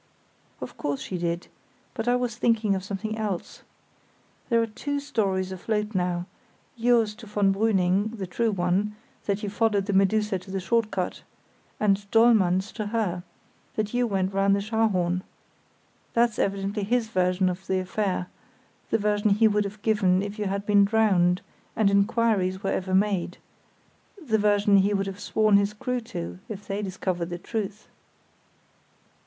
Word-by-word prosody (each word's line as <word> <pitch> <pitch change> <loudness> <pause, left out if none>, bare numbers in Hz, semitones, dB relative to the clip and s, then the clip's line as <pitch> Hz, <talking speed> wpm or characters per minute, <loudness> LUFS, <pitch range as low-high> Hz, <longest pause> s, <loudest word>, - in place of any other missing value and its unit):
"Of - - -7
course 145 -1 -2
she 185 - -5
did; 170 0 -2 0.5
but 225 -1 -4
I 245 - +4
was 245 -3 -1
thinking 225 -3 +2
of 190 -1 -2
something 205 +2 -4
else. 205 -5 -4 0.9
There 235 -2 +4
are 230 - +2
two 285 +6 -3
stories 195 -9 -1
afloat 210 +3 -2
now—yours 215 +5 -1
to 225 +1 -13
von 205 -1 +2
Brüning, 200 +1 +1
the 195 - -3
true 225 +6 0
one, 195 +2 0 0.3
that 200 +1 -1
you 205 - -2
followed 210 -3 +1
the 205 - -2
Medusa 195 +1 +2
to 185 - -15
the 195 0 -2
short 225 +3 +1
cut; 185 -3 -3 0.6
and 200 -1 +1
Dollmann's 205 -5 +4
to 215 -2 -4
her, 205 -5 -1 0.5
that 215 0 -2
you 245 0 +2
went 190 -2 -1
round 195 0 +3
the - - 0
Scharhorn. 200 -5 +1 0.9
That's 235 -1 +2
evidently 200 +1 -1
his 225 +2 0
version 185 -2 +1
of 185 +1 -4
the 190 - +1
affair—the 185 +1 -4
version 210 0 +1
he 210 +3 +5
would 210 -1 +1
have 205 +1 -8
given 195 -4 +3
if 205 +1 -6
you 210 - -1
had 200 +1 -2
been 205 -1 +5
drowned 195 -4 +3 0.3
and 210 -2 +3
inquiries 200 -2 +2
were 195 - 0
ever 185 0 -1
made; 190 -3 +1 0.8
the 230 -11 0
version 205 -1 +4
he 200 +1 +3
would 195 0 0
have 195 0 -6
sworn 215 0 +3
his 200 +1 +1
crew 250 +3 -2
to 85 - -6
if 205 -1 -7
they 200 +1 -2
discovered 185 -3 -3
the 175 - -4
truth." 210 +2 -5
200 Hz, 160 wpm, -26 LUFS, 190-220 Hz, 0.9 s, he